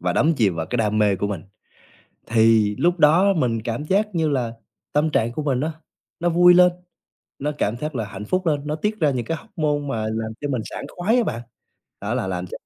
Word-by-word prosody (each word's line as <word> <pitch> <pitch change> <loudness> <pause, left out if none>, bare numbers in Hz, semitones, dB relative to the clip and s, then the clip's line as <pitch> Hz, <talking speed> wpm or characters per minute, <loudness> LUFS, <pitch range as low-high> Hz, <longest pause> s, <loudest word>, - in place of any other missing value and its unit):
và 90 0 0
đắm 160 - +3
chìm 100 -9 +2
vào 80 -1 -3
cái 125 - -2
đam 110 -2 +1
mê 105 -2 +3
của 100 - -1
mình, 100 -6 -4 0.8
thì 110 -2 +3
lúc 175 +1 +2
đó 170 +6 +5
mình 120 - 0
cảm 120 +6 -3
giác 200 +4 0
như 160 -2 +1
là 125 -5 -1 0.4
tâm 150 +2 +2
trạng 115 -3 +1
của 150 - -4
mình 135 -3 0
á, 160 +2 -1 0.5
nó 175 - +1
vui 175 +1 +6
lên, 180 0 +6 0.7
nó 150 +2 -2
cảm 105 +3 0
giác 150 +4 -5
là 115 -4 -2
hạnh 105 0 -8
phúc 185 +9 -1
lên, 145 -3 +1
nó 150 - -1
tiết 210 +6 -2
ra 150 -3 +3
những 125 -3 -2
cái 165 - -2
hoóc-môn 150 -2 -2
mà 115 -5 -2
làm 110 0 -3
cho 145 - -3
mình 125 -5 -1
sảng - - -7
khoái 200 +7 0
á 245 - +4
bạn. 115 - -3 0.6
Đó - - -2
là 95 - -1
làm 90 -1 -3
ch - - -18
140 Hz, 235 wpm, -22 LUFS, 110-165 Hz, 0.8 s, vui